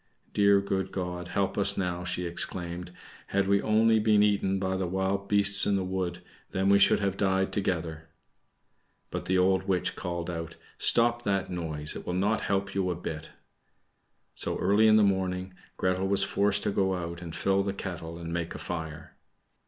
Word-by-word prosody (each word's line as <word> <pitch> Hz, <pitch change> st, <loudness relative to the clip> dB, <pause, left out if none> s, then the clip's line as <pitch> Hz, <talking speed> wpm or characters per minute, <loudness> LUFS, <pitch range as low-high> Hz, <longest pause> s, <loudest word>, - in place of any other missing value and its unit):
"Dear 100 Hz, -1 st, +4 dB
good 95 Hz, -1 st, -3 dB
God, 90 Hz, -1 st, -5 dB
help 95 Hz, +3 st, -1 dB
us 100 Hz, -, +3 dB
now!" 90 Hz, -2 st, -2 dB
she 90 Hz, 0 st, -2 dB
exclaimed. 85 Hz, +1 st, -1 dB, 0.4 s
"Had 100 Hz, 0 st, 0 dB
we 100 Hz, 0 st, +3 dB
only 110 Hz, +1 st, +3 dB
been 105 Hz, -1 st, +3 dB
eaten 100 Hz, -2 st, +1 dB
by 95 Hz, 0 st, -2 dB
the 95 Hz, -1 st, -2 dB
wild 95 Hz, +2 st, -2 dB
beasts 100 Hz, 0 st, +7 dB
in 100 Hz, -, +2 dB
the 95 Hz, -, -1 dB
wood, 90 Hz, -1 st, -4 dB, 0.3 s
then 95 Hz, 0 st, 0 dB
we 100 Hz, 0 st, +5 dB
should 100 Hz, -, +4 dB
have 100 Hz, -1 st, -2 dB
died 95 Hz, -1 st, 0 dB
together." 80 Hz, -5 st, -3 dB, 1.0 s
But -, -, -5 dB
the 95 Hz, -, +1 dB
old 95 Hz, +1 st, +2 dB
witch 90 Hz, -2 st, -1 dB
called 85 Hz, -2 st, -4 dB
out, 85 Hz, -1 st, -6 dB, 0.2 s
"Stop 120 Hz, 0 st, +3 dB
that 95 Hz, -2 st, -1 dB
noise; 80 Hz, -4 st, -3 dB
it -, -, -7 dB
will 90 Hz, -, -2 dB
not 105 Hz, +4 st, 0 dB
help 95 Hz, 0 st, -2 dB
you 95 Hz, -2 st, -1 dB
a 90 Hz, -, -1 dB
bit." 80 Hz, -2 st, -7 dB, 1.0 s
So, -, -, -3 dB
early 105 Hz, +2 st, +3 dB
in 110 Hz, -, +6 dB
the 110 Hz, -, +5 dB
morning, 95 Hz, -1 st, -1 dB, 0.2 s
Gretel 95 Hz, +1 st, 0 dB
was 100 Hz, 0 st, +2 dB
forced 100 Hz, 0 st, +1 dB
to -, -, 0 dB
go 95 Hz, -1 st, 0 dB
out 85 Hz, -1 st, -6 dB
and 85 Hz, -2 st, -8 dB
fill 95 Hz, 0 st, +1 dB
the 100 Hz, 0 st, -2 dB
kettle, 85 Hz, -4 st, -7 dB
and 85 Hz, 0 st, -6 dB
make 85 Hz, 0 st, -3 dB
a -, -, -5 dB
fire. 80 Hz, -2 st, -7 dB
95 Hz, 185 wpm, -28 LUFS, 90-100 Hz, 1.0 s, beasts